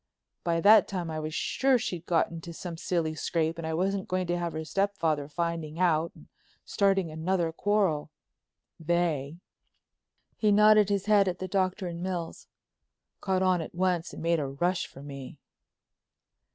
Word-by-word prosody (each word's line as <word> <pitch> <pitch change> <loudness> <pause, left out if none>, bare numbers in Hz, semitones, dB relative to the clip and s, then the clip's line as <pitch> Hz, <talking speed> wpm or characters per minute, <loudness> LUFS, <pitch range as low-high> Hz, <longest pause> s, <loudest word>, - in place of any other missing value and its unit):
By 165 -1 0
that 210 +1 +7
time 175 -4 -4
I 155 - -3
was 155 +1 -4
sure 265 0 +2
she'd 180 -7 -4
got 165 -2 +2
into 170 0 -8
some 170 0 -6
silly 165 -1 -1
scrape 160 +1 -1
and 165 - -4
I 160 - -1
wasn't 190 +2 -1
going 185 0 -1
to 175 0 -1
have 170 -1 -3
her 160 0 -4
stepfather 165 -6 0
finding 165 0 -3
out 165 -2 +2
and - - -16 0.4
starting 195 -5 +1
another 165 +1 -1
quarrel. 185 -5 0 0.7
They," 165 -3 -1 1.0
he 210 -2 +2
nodded 210 0 +6
his 200 -1 0
head 205 -2 +4
at 180 -1 -1
the 185 - -5
Doctor 185 +1 0
and 170 -1 -5
Mills, 180 -3 -4 0.7
"caught 190 -1 0
on 185 -2 +2
at 160 - -8
once 180 -2 0
and - - -8
made 170 0 +2
a 140 - -2
rush 175 +7 -1
for 135 - -13
me. 140 -1 -9
175 Hz, 165 wpm, -28 LUFS, 160-190 Hz, 1.0 s, that